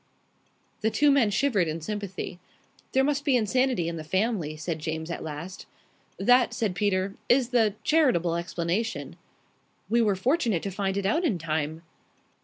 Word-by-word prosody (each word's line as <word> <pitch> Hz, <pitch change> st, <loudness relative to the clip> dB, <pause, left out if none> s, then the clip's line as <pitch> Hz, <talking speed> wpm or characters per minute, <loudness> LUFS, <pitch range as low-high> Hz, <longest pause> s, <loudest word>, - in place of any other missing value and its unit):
The 220 Hz, -, +2 dB
two 290 Hz, +5 st, +3 dB
men 270 Hz, -6 st, +4 dB
shivered 205 Hz, -4 st, +1 dB
in 160 Hz, +1 st, -3 dB
sympathy. 195 Hz, 0 st, -5 dB, 0.5 s
"There 265 Hz, -, +3 dB
must 285 Hz, 0 st, 0 dB
be 275 Hz, -4 st, +3 dB
insanity 245 Hz, -4 st, +1 dB
in 170 Hz, 0 st, -3 dB
the 155 Hz, -, -6 dB
family," 185 Hz, -3 st, -1 dB
said 160 Hz, +1 st, -3 dB
James 160 Hz, +1 st, -4 dB
at -, -, -4 dB
last. 160 Hz, +5 st, -7 dB, 0.5 s
"That," 245 Hz, +3 st, +4 dB
said 215 Hz, -5 st, -1 dB
Peter, 195 Hz, 0 st, 0 dB, 0.2 s
"is 245 Hz, -1 st, +4 dB
the 225 Hz, -5 st, +2 dB
charitable 245 Hz, -, +3 dB
explanation." 175 Hz, +5 st, -2 dB, 0.8 s
"We 235 Hz, +1 st, +4 dB
were 210 Hz, -3 st, +2 dB
fortunate 235 Hz, -, +1 dB
to 195 Hz, -, -3 dB
find 195 Hz, 0 st, -2 dB
it 200 Hz, -, -2 dB
out 315 Hz, -, +1 dB
in 270 Hz, -, +1 dB
time." 160 Hz, 0 st, -3 dB
200 Hz, 160 wpm, -27 LUFS, 170-245 Hz, 0.8 s, men